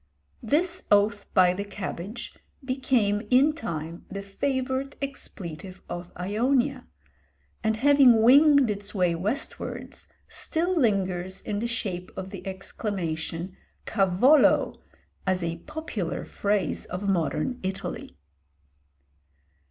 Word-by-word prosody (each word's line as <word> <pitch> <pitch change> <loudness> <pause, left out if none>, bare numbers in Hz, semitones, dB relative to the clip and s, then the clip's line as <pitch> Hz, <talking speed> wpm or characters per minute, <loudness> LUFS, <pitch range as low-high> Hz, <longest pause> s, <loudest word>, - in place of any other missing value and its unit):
This 335 +9 0
oath 205 0 +3
by 180 -1 +6
the 200 +2 -3
cabbage 200 +2 -6 0.3
became 255 -6 +1
in 275 +4 +5
time 165 - -5
the 200 0 -5
favourite 260 +6 -2
expletive 190 - -7
of 175 0 -6
Ionia, 245 +8 0 0.8
and 220 0 +1
having 260 -3 +6
winged 280 0 +7
its 205 +1 -5
way 180 -3 +2
westwards, 205 - -4 0.2
still 345 +3 -1
lingers 190 - 0
in 205 -1 -2
the 235 - -1
shape 185 -6 -3
of 190 0 -5
the 195 -1 -8
exclamation 185 -3 -4 0.3
Cavolo! 210 +9 +4 0.5
as 185 -1 +1
a 170 0 -2
popular 300 - -4
phrase 205 -1 -1
of 185 +3 -4
modern 195 - 0
Italy. 190 - -5
205 Hz, 105 wpm, -26 LUFS, 185-260 Hz, 0.8 s, winged